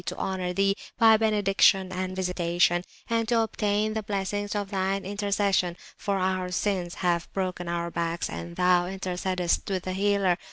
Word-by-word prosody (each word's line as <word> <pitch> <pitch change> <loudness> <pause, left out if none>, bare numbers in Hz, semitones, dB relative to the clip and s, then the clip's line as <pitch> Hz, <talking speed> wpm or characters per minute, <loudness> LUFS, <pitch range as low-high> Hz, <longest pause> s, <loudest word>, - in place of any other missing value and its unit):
to - - -5
honour 185 -1 -2
Thee 195 +2 +2 0.2
by 225 -1 +7
benediction 195 -3 +3
and 185 0 -3
visitation), 175 -1 +1 0.2
and 230 -1 0
to 235 -1 +3
obtain 215 -1 0
the 220 - -2
Blessings 205 0 -2
of 205 -1 -3
Thine 195 0 -1
Intercession, 200 -3 0 0.2
for 200 -1 -1
our 185 -1 0
Sins 180 -2 -1
have 170 -1 +1
broken 185 -2 -3
our 170 0 -2
Backs, 170 0 -2
and 85 0 -7
Thou 180 -1 +3
intercedest 185 -1 -1
with 190 -2 -1
the 185 - -3
Healer. 195 -2 +2
190 Hz, 160 wpm, -27 LUFS, 180-205 Hz, 0.2 s, by